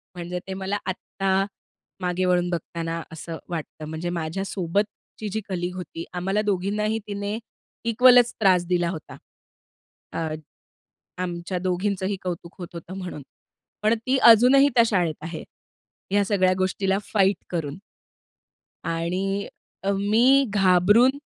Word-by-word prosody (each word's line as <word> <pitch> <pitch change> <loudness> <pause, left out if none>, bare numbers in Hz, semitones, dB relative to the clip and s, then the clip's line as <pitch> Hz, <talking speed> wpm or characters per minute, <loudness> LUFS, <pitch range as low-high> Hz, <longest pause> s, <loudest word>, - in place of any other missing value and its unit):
म्हणजे 175 +1 -4
ते 190 - -4
मला 195 +2 -2
आत्ता 190 +1 -1 0.6
मागे 180 +1 0
वळून 180 -1 +2
बघताना 165 0 -3
असं 160 0 -6
वाटतं. 155 -2 -5
म्हणजे 160 +2 -3
माझ्यासोबतची 195 +5 -3
जी 220 - -1
कलीग 180 0 -2
होती, 175 -2 -6
आम्हाला 195 +4 0
दोघींनाही 210 +2 0
तिने 205 +1 -3 0.5
इक्वलच 245 +1 +6
त्रास 185 -4 +4
दिला 175 -1 +1
होता. 160 -3 -7 1.0
अ, - - -4 1.0
आमच्या 175 +1 -3
दोघींचेही 190 +2 -1
कौतुक 175 -1 -5
होत 175 - -5
होतं 170 +3 -8
म्हणून, 180 -6 -6 0.6
पण 220 +2 +4
ती 255 +4 0
अजूनही 260 +5 +6
त्या 235 - +7
शाळेत 175 -7 +1
आहे, 165 -1 -5 0.7
ह्या 205 0 +4
सगळ्या 190 -2 +3
गोष्टीला 190 +1 +1
फाईट 195 -2 +3
करून. 160 -3 -3 1.2
आणि 175 +4 -1 0.6
अ, 195 - +1 0.2
मी 225 +3 +4 0.3
घाबरून 205 +8 +5
185 Hz, 120 wpm, -24 LUFS, 175-205 Hz, 1.2 s, त्या